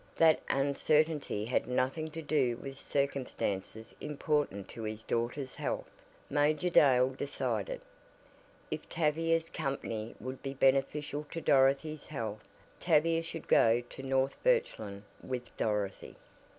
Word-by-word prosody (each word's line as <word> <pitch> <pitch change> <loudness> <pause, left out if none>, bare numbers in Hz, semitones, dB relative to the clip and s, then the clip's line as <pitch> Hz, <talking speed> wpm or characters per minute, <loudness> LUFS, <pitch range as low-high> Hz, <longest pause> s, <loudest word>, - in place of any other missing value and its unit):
That 160 -1 +5
uncertainty 145 -3 +1
had 125 - 0
nothing 130 +5 0
to 160 +1 -7
do 135 -6 +1
with 135 -1 -8
circumstances 125 -6 -2
important 145 -9 -1
to 115 - -8
his 110 0 -4
daughter's 125 +3 -2
health, - - -3 0.4
Major 150 +4 +2
Dale 130 -5 +6
decided. 145 - -3 0.9
If - - -5
Tavia's 165 +1 +1
company 115 -7 -4
would 130 +1 -6
be 135 0 -5
beneficial 140 +2 +1
to 165 - -4
Dorothy's 140 +1 +3
health 110 -7 -4 0.4
Tavia 165 +2 +3
should 165 -1 -7
go 115 +2 +5
to - - -8
North 135 0 0
Birchland 110 - +1 0.2
with 125 -2 -5
Dorothy. 105 -3 -2
135 Hz, 120 wpm, -32 LUFS, 120-155 Hz, 0.9 s, Dale